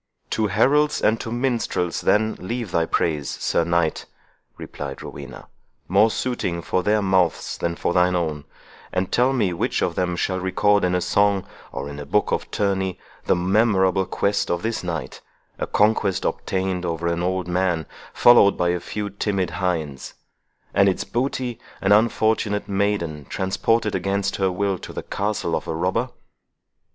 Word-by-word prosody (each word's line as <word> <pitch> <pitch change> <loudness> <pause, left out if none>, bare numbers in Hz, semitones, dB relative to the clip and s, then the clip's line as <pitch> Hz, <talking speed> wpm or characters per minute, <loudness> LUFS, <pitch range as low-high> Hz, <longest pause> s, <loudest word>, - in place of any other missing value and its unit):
"To 110 -1 +1
heralds 140 +10 +3
and 110 +1 +2
to 115 - -5
minstrels, 120 -8 -1
then, 110 +1 +2
leave 115 +1 -4
thy 85 -1 +1
praise, 75 -4 0
Sir - - 0
Knight," 85 -1 0 0.5
replied 70 -1 -7
Rowena, 70 -1 -9 0.4
"more 100 +5 +4
suiting 95 -9 -2
for 90 - 0
their 105 +2 +2
mouths 95 -4 +1
than 85 0 -2
for 85 - -1
thine 90 0 +3
own; 80 -4 -2 0.5
and 95 0 -1
tell 125 +2 +3
me 110 -9 +1
which 85 - -1
of - - 0
them 90 -1 -1
shall 95 +2 -1
record 100 +2 +2
in 90 0 +2
song, 100 0 +2 0.3
or 70 - -5
in 70 0 -7
book - - +1
of - - -1
tourney, 95 -2 -1 0.3
the - - +3
memorable 95 0 +2
conquest 100 0 0
of 85 0 -1
this 115 -2 -2
night, 80 -7 -5 0.4
a - - -2
conquest 105 -3 +2
obtained 95 -1 -1
over 85 -1 -3
an 85 0 0
old 90 0 -1
man, 90 -3 0 0.3
followed 120 -5 +6
by 90 -1 +1
a 90 0 0
few 105 +3 -5
timid 100 -3 -1
hinds; 80 -7 -3 0.6
and 100 0 +5
its 95 - -1
booty, 125 -1 -2 0.2
an 95 - 0
unfortunate 110 -1 +2
maiden, 95 -7 -1
transported 105 +5 0
against 100 +1 -1
her 95 -1 +1
will 95 0 -1
to - - -9
the - - -5
castle 105 +1 -2
of - - -4
a - - -2
robber?" 95 +9 0
95 Hz, 160 wpm, -23 LUFS, 85-105 Hz, 0.6 s, followed